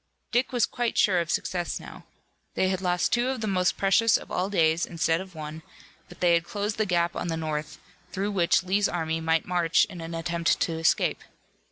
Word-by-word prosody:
Dick 245 Hz, +2 st, +1 dB
was 245 Hz, -2 st, +2 dB
quite 240 Hz, -1 st, -3 dB
sure 185 Hz, -4 st, +4 dB
of 170 Hz, -2 st, -3 dB
success 175 Hz, 0 st, -2 dB
now. -, -, -12 dB, 0.5 s
They 190 Hz, -, +2 dB
had 190 Hz, -1 st, -1 dB
lost 180 Hz, +2 st, 0 dB
two 240 Hz, +1 st, +2 dB
of 265 Hz, -, -2 dB
the -, -, -1 dB
most 185 Hz, -3 st, +1 dB
precious 215 Hz, +4 st, +4 dB
of -, -, -12 dB
all 185 Hz, +2 st, -1 dB
days 165 Hz, -4 st, +2 dB
instead 165 Hz, 0 st, 0 dB
of 190 Hz, -2 st, -11 dB
one, 155 Hz, 0 st, -7 dB, 0.5 s
but -, -, -15 dB
they 175 Hz, -1 st, +4 dB
had 170 Hz, 0 st, +3 dB
closed 205 Hz, +4 st, -3 dB
the 215 Hz, -, +1 dB
gap 175 Hz, -1 st, +1 dB
on -, -, -3 dB
the 165 Hz, -1 st, -2 dB
north, 155 Hz, -1 st, -4 dB, 0.3 s
through 195 Hz, +3 st, -2 dB
which 175 Hz, -4 st, +2 dB
Lee's 195 Hz, +3 st, +1 dB
army 160 Hz, -1 st, -2 dB
might 160 Hz, 0 st, +1 dB
march 175 Hz, -2 st, +2 dB
in 180 Hz, -5 st, -10 dB
an 165 Hz, 0 st, -6 dB
attempt 165 Hz, 0 st, 0 dB
to 165 Hz, -, +1 dB
escape. 165 Hz, -, +1 dB
175 Hz, 210 wpm, -26 LUFS, 165-195 Hz, 0.5 s, sure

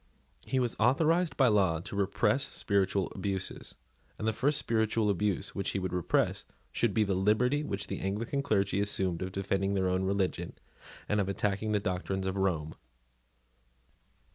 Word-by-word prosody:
He 130 Hz, -, 0 dB
was 120 Hz, -2 st, 0 dB
authorised 165 Hz, +6 st, +2 dB
by 135 Hz, -, +5 dB
law 95 Hz, -6 st, +3 dB
to 95 Hz, -, -7 dB
repress 105 Hz, +5 st, +1 dB
spiritual 100 Hz, -1 st, 0 dB
abuses; 95 Hz, -1 st, -3 dB, 0.4 s
and 110 Hz, -, -3 dB
the 110 Hz, -, +2 dB
first 140 Hz, +6 st, +2 dB
spiritual 110 Hz, -1 st, +1 dB
abuse 100 Hz, 0 st, -1 dB
which 100 Hz, -, -2 dB
he -, -, -2 dB
would 95 Hz, -1 st, -3 dB
repress 90 Hz, -2 st, +1 dB, 0.3 s
should 120 Hz, -4 st, 0 dB
be 110 Hz, -, +4 dB
the 100 Hz, -2 st, 0 dB
liberty 110 Hz, +10 st, +2 dB
which 100 Hz, -8 st, -3 dB
the -, -, -5 dB
Anglican 115 Hz, +9 st, -2 dB
clergy 100 Hz, -6 st, +1 dB
assumed 95 Hz, -4 st, 0 dB
of 95 Hz, 0 st, -3 dB
defending 95 Hz, +1 st, -1 dB
their 95 Hz, -1 st, +1 dB
own 95 Hz, +1 st, 0 dB
religion 95 Hz, -1 st, -1 dB, 0.5 s
and 105 Hz, 0 st, +1 dB
of 100 Hz, -, -2 dB
attacking 100 Hz, +2 st, -1 dB
the 105 Hz, -, +2 dB
doctrines 95 Hz, 0 st, -2 dB
of 95 Hz, 0 st, -1 dB
Rome. 85 Hz, -6 st, -1 dB
100 Hz, 165 wpm, -30 LUFS, 95-110 Hz, 0.5 s, by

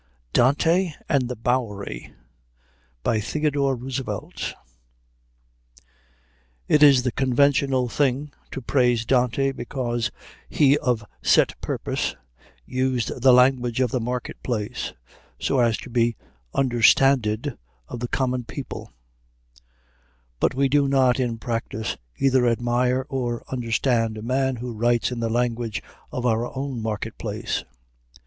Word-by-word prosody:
DANTE 160 Hz, +7 st, +3 dB
AND 130 Hz, -3 st, +1 dB
THE 125 Hz, -, -3 dB
BOWERY 110 Hz, -, -2 dB, 0.9 s
THEODORE 140 Hz, +5 st, 0 dB
ROOSEVELT 130 Hz, +1 st, -5 dB, 2.1 s
It 150 Hz, -, +4 dB
is 140 Hz, -4 st, +7 dB
the 125 Hz, -, 0 dB
conventional 135 Hz, 0 st, +2 dB
thing 140 Hz, +3 st, 0 dB, 0.2 s
to 135 Hz, -, -6 dB
praise 120 Hz, -3 st, +2 dB
Dante 130 Hz, +2 st, +2 dB
because 120 Hz, -2 st, -2 dB, 0.4 s
he 140 Hz, -1 st, +4 dB
of 120 Hz, -4 st, 0 dB, 0.2 s
set -, -, +4 dB
purpose -, -, -2 dB, 0.5 s
"used 130 Hz, -1 st, -1 dB
the 130 Hz, +1 st, +7 dB
language 125 Hz, -1 st, +4 dB
of 125 Hz, -3 st, +2 dB
the 130 Hz, -, 0 dB
market 125 Hz, +1 st, -4 dB
place," 120 Hz, 0 st, -3 dB, 0.5 s
so 135 Hz, -, +1 dB
as 115 Hz, -3 st, +3 dB
to -, -, -9 dB
be 115 Hz, -1 st, +2 dB, 0.4 s
understanded 125 Hz, -1 st, +3 dB, 0.3 s
of -, -, -6 dB
the 120 Hz, -, -2 dB
common 125 Hz, -1 st, -1 dB
people; -, -, -7 dB, 1.5 s
but -, -, +1 dB
we 135 Hz, +1 st, +3 dB
do 140 Hz, +1 st, +3 dB
not 135 Hz, -2 st, +3 dB
in 120 Hz, -3 st, -1 dB
practice 115 Hz, -1 st, -3 dB, 0.2 s
either 130 Hz, -2 st, +3 dB
admire 120 Hz, +2 st, +1 dB
or 125 Hz, -4 st, -2 dB
understand 115 Hz, -2 st, 0 dB
a 110 Hz, -, -7 dB
man 130 Hz, +2 st, 0 dB
who 120 Hz, 0 st, -5 dB
writes 120 Hz, +2 st, +1 dB
in 125 Hz, -, -4 dB
the 115 Hz, -1 st, -1 dB
language 120 Hz, -1 st, -1 dB, 0.3 s
of 125 Hz, -, -3 dB
our 115 Hz, 0 st, +1 dB
own 135 Hz, -3 st, -3 dB
market 110 Hz, -1 st, -4 dB
place. -, -, -3 dB
125 Hz, 120 wpm, -24 LUFS, 115-135 Hz, 2.1 s, is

